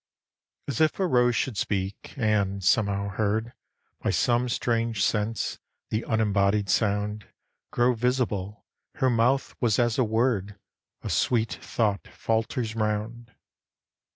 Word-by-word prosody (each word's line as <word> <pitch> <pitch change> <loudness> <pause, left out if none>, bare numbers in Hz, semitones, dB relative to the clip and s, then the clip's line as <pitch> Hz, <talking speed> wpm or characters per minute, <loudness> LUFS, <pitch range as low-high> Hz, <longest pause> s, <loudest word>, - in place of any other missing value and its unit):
As 140 +2 -2
if 155 +4 +2
a 190 - +2
rose 125 -7 +3
should 115 -1 -1
speak 100 -1 -3
and, 100 -4 +1
somehow 100 0 +2
heard 110 +4 -1 0.5
By - - -1
some 120 +1 +2
strange 115 -3 0
sense, 110 +1 -1 0.3
the 110 +1 -1
unembodied 105 -2 +1
sound 105 -1 0 0.4
Grow 120 +1 +2
visible, 115 -4 -1 0.3
her 130 -3 +2
mouth 120 +4 +2
was 115 -4 +2
as 120 0 +1
a - - +5
word 110 -3 0 0.5
A - - -4
sweet 115 -2 +1
thought 105 -4 -1
falters 115 0 -2
'round. 110 +2 -3
110 Hz, 125 wpm, -26 LUFS, 105-120 Hz, 0.5 s, a